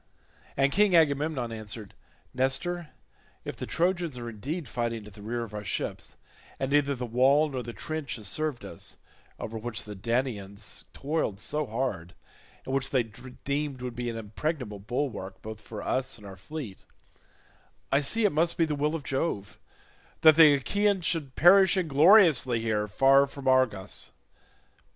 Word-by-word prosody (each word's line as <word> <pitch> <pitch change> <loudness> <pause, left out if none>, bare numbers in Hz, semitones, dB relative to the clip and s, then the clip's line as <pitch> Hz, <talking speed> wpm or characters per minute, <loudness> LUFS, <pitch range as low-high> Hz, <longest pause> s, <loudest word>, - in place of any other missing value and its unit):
And 135 +1 +3
King 200 +2 +4
Agamemnon 145 -5 +2
answered, 110 -1 -6 0.4
"Nestor, 150 +6 0 0.6
if - - -5
the - - -6
Trojans 175 -5 0
are 120 -1 -5
indeed 140 - -5
fighting 115 -2 -3
at 105 - -12
the 105 - -13
rear 120 +3 -3
of 110 -2 -9
our 105 -1 -5
ships, - - -3 0.4
and 135 0 -2
neither 140 -1 +3
the 125 -1 -4
wall 135 +6 +4
nor 130 -3 -3
the 120 0 -6
trench 155 +2 -4
has 110 -4 -6
served 155 +1 -2
us—over 110 0 -8
which 115 0 -4
the 105 - -8
Danaans 105 -2 -3
toiled 140 -9 -2
so 150 +5 -2
hard, 105 -8 -3 0.5
and 130 - -4
which 135 -1 0
they 130 -3 +2
deemed 130 +4 -5
would 125 -2 -5
be 120 0 -3
an 115 - -4
impregnable 115 0 -4
bulwark 105 -4 -4
both 110 0 -7
for 105 -2 -8
us 130 -2 -1
and 105 - -14
our 95 -1 -9
fleet—I 135 - -7
see 220 +10 +1
it 205 - +4
must 165 +3 +1
be 165 - +4
the 155 - -2
will 150 +2 0
of 155 - -5
Jove 130 - -2 0.6
that 160 -2 +8
the 155 -3 +8
Achaeans 200 +6 +1
should 150 -7 -1
perish 190 +3 +6
ingloriously 155 - +5
here, 110 -2 0
far 135 +6 +5
from 140 -1 -8
Argos. 130 -7 +1
130 Hz, 160 wpm, -28 LUFS, 110-155 Hz, 0.6 s, that